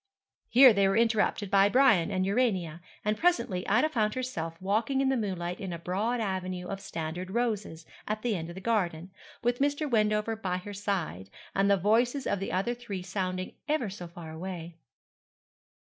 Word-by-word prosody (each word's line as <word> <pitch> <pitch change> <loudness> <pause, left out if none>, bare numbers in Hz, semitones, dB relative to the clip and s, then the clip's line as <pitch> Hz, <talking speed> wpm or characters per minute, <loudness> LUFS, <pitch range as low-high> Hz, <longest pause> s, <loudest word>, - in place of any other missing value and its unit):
Here 255 0 +8
they 200 -1 +3
were 195 +2 +2
interrupted 220 -3 +1
by 200 0 +5
Brian 220 -9 +4
and 185 -2 0
Urania, 190 -7 0 0.2
and 210 0 0
presently 325 - +1
Ida 240 +9 +4
found 215 -8 0
herself 165 -11 -4
walking 220 +8 0
in 270 -1 +2
the 265 - +2
moonlight 185 -6 -3
in 190 -3 -5
a 170 - -4
broad 205 +8 -1
avenue 185 -3 -3
of 195 - -4
standard 175 0 -5
roses, 210 -7 -2 0.2
at 215 0 -2
the 235 -4 +1
end 165 -2 -4
of 170 - -8
the 190 - -8
garden, 185 -6 -1 0.3
with 240 +1 +1
Mr. 285 +2 +1
Wendover 215 -2 +1
by 185 -4 -2
her 205 +3 -7
side, 185 - -3 0.2
and 195 +1 +2
the 200 - +5
voices 235 +8 +2
of 200 - 0
the 195 - -3
other 195 +6 0
three 215 -7 -6
sounding 185 -1 -3 0.2
ever 260 -10 0
so 180 -3 -7
far 170 -1 -10
away. 170 0 -7
200 Hz, 180 wpm, -29 LUFS, 180-230 Hz, 0.3 s, Here